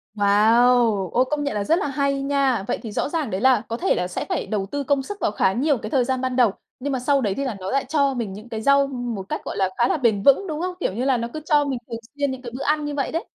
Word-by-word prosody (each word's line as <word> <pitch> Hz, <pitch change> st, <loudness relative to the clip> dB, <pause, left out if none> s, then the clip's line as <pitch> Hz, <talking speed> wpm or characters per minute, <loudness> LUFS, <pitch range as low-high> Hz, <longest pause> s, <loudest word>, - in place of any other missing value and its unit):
Wow! 215 Hz, 0 st, +3 dB
Ôi, 250 Hz, +2 st, +3 dB
công 300 Hz, -1 st, -1 dB
nhận 280 Hz, -7 st, -2 dB
là 205 Hz, -, -1 dB
rất 330 Hz, -, +2 dB
là -, -, -1 dB
hay 275 Hz, 0 st, 0 dB
nha! 275 Hz, -6 st, +1 dB
Vậy -, -, -1 dB
thì 225 Hz, -, -6 dB
rõ 240 Hz, -, -1 dB
ràng 310 Hz, -5 st, -2 dB
đấy 190 Hz, -1 st, -3 dB
là 260 Hz, 0 st, +4 dB
có 230 Hz, -, -3 dB
thể 380 Hz, -, +1 dB
là 180 Hz, -, -1 dB
sẽ 180 Hz, -, -4 dB
phải -, -, -1 dB
đầu 205 Hz, -3 st, -2 dB
tư 285 Hz, 0 st, -2 dB
công 275 Hz, 0 st, +1 dB
sức 410 Hz, +9 st, -7 dB
vào -, -, +1 dB
khá 190 Hz, -2 st, +1 dB
nhiều 280 Hz, +5 st, +1 dB
cái 215 Hz, -1 st, -6 dB
thời 255 Hz, +2 st, +2 dB
gian 260 Hz, 0 st, -1 dB
ban 255 Hz, -1 st, -2 dB
đầu, 245 Hz, -5 st, +4 dB, 0.3 s
nhưng 280 Hz, +2 st, -3 dB
mà 260 Hz, -, -1 dB
sau 275 Hz, +2 st, +2 dB
đấy 205 Hz, -5 st, 0 dB
thì 275 Hz, -, -1 dB
là 255 Hz, -5 st, -3 dB
nó 185 Hz, 0 st, -5 dB
lại 275 Hz, 0 st, 0 dB
cho 280 Hz, -1 st, +1 dB
mình 230 Hz, -6 st, -4 dB
những 215 Hz, +4 st, -11 dB
cái 220 Hz, -1 st, -4 dB
rau 280 Hz, +2 st, +4 dB
một 245 Hz, -6 st, -4 dB
cách, -, -, -3 dB
gọi -, -, -5 dB
là, 190 Hz, -1 st, +1 dB
khá 240 Hz, -, +3 dB
là -, -, +1 dB
bền 220 Hz, -6 st, +1 dB
vững, 280 Hz, +8 st, +4 dB
đúng 310 Hz, 0 st, -4 dB
không? 365 Hz, 0 st, -3 dB
Kiểu, 265 Hz, -, -1 dB
như 240 Hz, +6 st, -2 dB
là 265 Hz, -2 st, +3 dB
nó 235 Hz, 0 st, -3 dB
cứ 310 Hz, -, -5 dB
cho 295 Hz, -1 st, +3 dB
mình 270 Hz, -3 st, -2 dB
thường 230 Hz, -1 st, -5 dB, 0.2 s
xuyên 285 Hz, -1 st, 0 dB
những 260 Hz, -1 st, -6 dB
cái 240 Hz, -2 st, -8 dB
bữa 270 Hz, -, -4 dB
ăn 300 Hz, 0 st, +1 dB
như 290 Hz, -, -4 dB
vậy 275 Hz, -, -1 dB
đấy. 330 Hz, -, -3 dB
260 Hz, 320 wpm, -23 LUFS, 225-280 Hz, 0.3 s, là